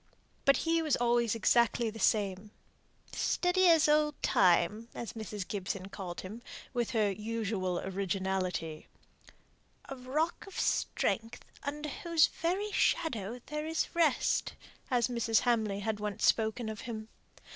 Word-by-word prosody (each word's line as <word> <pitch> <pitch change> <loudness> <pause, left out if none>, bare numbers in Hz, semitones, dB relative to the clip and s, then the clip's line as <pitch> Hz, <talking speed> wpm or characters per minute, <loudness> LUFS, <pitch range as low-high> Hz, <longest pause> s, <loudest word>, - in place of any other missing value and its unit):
But 275 - +5
he 330 0 +2
was 310 -4 +2
always 235 -2 +2
exactly 235 0 +2
the 225 - -10
same; 205 -2 +1 0.6
"steady 365 +1 +2
as 320 -2 +6
old 300 0 +2
Time," 190 +5 +3
as 235 - -5
Mrs. 210 -3 -6
Gibson 195 -1 -4
called 180 -3 -6
him, 210 +5 -8 0.3
with 240 -3 0
her 215 -4 +2
usual 210 -3 -2
originality; 190 -4 -2 1.0
"a 270 - -6
rock 290 +9 -2
of 390 - -7
strength, 225 0 -1 0.2
under 295 +1 -4
whose 330 +1 +3
very 380 +5 -2
shadow 240 - 0
there 300 +1 -4
is 320 0 -1
rest," 330 -5 +2 0.4
as 245 -3 +2
Mrs. 235 -2 +1
Hamley 220 -5 +1
had 215 0 -2
once 210 -1 -2
spoken 220 +1 +2
of 215 -1 -5
him. 220 -1 -5
230 Hz, 135 wpm, -31 LUFS, 200-290 Hz, 1.0 s, as